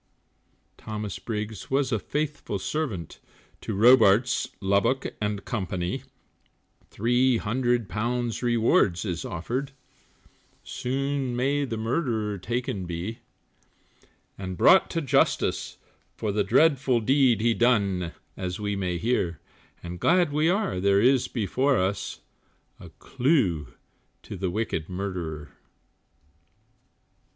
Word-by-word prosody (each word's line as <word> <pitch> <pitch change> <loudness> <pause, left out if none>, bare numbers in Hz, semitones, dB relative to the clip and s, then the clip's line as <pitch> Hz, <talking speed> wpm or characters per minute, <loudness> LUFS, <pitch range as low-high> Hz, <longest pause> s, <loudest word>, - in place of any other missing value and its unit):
Thomas 105 -2 -5
Briggs 110 -3 -5
was 135 0 +1
a 110 - +1
faithful 145 -3 -3
servant, 100 - -4 0.4
To - - -4
Robarts, 120 +1 +5
Lubbock 100 +7 +1
and 105 -1 -2
Company, 90 -6 -3 0.9
Three 120 +3 +2
hundred 120 0 0
pounds 120 +4 -2
rewards 115 -6 +2
is 90 -4 -3
offered, 125 - -4 0.9
Soon 135 0 -2
may 140 +3 +1
the 115 -4 -4
murderer 110 - -1
taken 105 -2 -3
be, 90 +8 -5 1.2
And 95 -2 -5
brought 190 - +6
to 165 - -2
justice 135 - +1 0.4
for 110 - -2
the 105 0 +1
dreadful 130 +2 +3
Deed 130 -1 +3
he 115 +1 +2
done, 100 -8 +1 0.2
as 90 0 -4
we 105 -1 -2
may 90 -3 -2
hear, 90 -6 -1 0.4
And 90 0 -7
glad 170 - +3
we 155 +2 +2
are 195 - 0
there 100 +1 +3
is 125 +3 +3
before 130 +5 +1
us, 95 +1 -2 0.6
A - - -11
clue 95 - 0 0.5
to - - -8
the 95 0 -2
wicked 95 -5 -3
murderer. 90 -6 -5
110 Hz, 110 wpm, -26 LUFS, 95-130 Hz, 1.2 s, brought